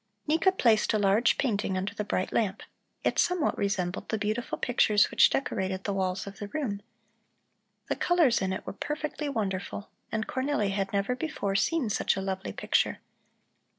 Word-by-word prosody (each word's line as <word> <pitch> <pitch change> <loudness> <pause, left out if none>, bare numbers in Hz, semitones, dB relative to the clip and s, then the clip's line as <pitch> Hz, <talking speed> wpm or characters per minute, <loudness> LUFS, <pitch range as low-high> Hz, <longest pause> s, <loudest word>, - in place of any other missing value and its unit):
Nika 325 +5 +3
placed 230 - +3
a - - +4
large 205 +4 +3
painting 205 -7 0
under 190 +2 -2
the 210 - -3
bright 190 -2 -2
lamp. 205 -3 0 0.4
It - - +1
somewhat 360 -4 +2
resembled 195 -2 -2
the 220 - 0
beautiful 215 +3 -2
pictures 215 -4 +3
which - - +6
decorated 190 -7 -2
the 200 - -1
walls 190 -1 -1
of 200 0 -9
the 205 - -5
room. 205 -5 -3 1.1
The - - 0
colors 335 -11 +3
in 190 -1 0
it 190 - -4
were - - -5
perfectly 300 +5 -3
wonderful, 200 -4 -3 0.2
and 220 0 -1
Cornelli 260 -6 0
had 195 0 -1
never 200 +5 0
before 255 -9 -2
seen 275 +7 +1
such - - +1
a 195 - -3
lovely 190 0 -3
picture. - - +1
210 Hz, 170 wpm, -28 LUFS, 195-260 Hz, 1.1 s, which